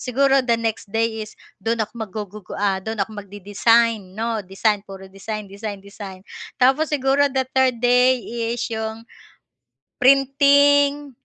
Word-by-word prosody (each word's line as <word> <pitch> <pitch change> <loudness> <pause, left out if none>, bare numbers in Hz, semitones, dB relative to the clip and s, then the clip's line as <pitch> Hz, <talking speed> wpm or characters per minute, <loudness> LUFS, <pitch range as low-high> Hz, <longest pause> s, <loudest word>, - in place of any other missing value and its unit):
siguro 270 +2 +2
the 240 -2 +1
next 225 -2 -3
day 225 +1 -1
is 215 - -15 0.2
do'n 225 +3 -1
ako 215 - -21 0.2
mag-gugug 205 0 -8
ah, 195 -1 0
do'n 220 +3 -5
ako 210 +1 -3
mag-de-design 205 +1 +1
'no? 225 0 -2
Design 200 +2 0
puro 195 -1 -10
design 210 +2 -6
design 200 0 -7
,design, 195 -1 -10 0.4
tapos 270 +5 +3
siguro 280 0 +2
the 265 0 0
third 260 -3 +2
day 250 +1 +5 0.3
is 240 0 -2
'yong, 220 0 -4 1.0
printing, 280 +2 +4
225 Hz, 140 wpm, -21 LUFS, 205-265 Hz, 1.0 s, day